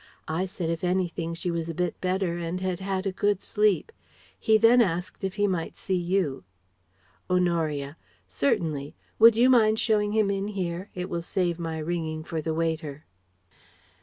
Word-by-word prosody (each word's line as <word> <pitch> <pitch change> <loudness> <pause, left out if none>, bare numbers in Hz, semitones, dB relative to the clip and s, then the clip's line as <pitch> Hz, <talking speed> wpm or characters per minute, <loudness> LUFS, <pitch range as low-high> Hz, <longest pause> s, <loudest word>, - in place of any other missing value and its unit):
I 165 +4 -1
said 180 -3 -3
if 165 +1 -4
anything 175 -2 -1
she 175 +1 -2
was 165 -1 -3
a 165 - -4
bit 180 -1 -2
better 185 -2 0
and 170 +2 -3
had 185 -1 -2
had 190 0 -2
a 195 - 0
good 205 +1 +1
sleep. 210 - +1 0.5
He 220 0 +4
then 230 +3 +6
asked 180 -3 -2
if 190 -1 -2
he 205 -1 +2
might 180 -5 -2
see 190 - -3
you." 175 - 0 0.9
Honoria: 165 -5 0 0.3
"Certainly. 140 - -1 0.2
Would 225 0 +8
you 245 +2 +6
mind 220 -4 +5
showing 210 -2 +1
him 215 -2 +2
in 195 0 -2
here? 185 -1 -4
It 180 0 -3
will 170 - -3
save 175 -1 -1
my 165 -1 -3
ringing 160 -1 -3
for 160 -1 -4
the 160 +1 -2
waiter." 160 -3 -2
180 Hz, 170 wpm, -26 LUFS, 165-195 Hz, 0.9 s, Would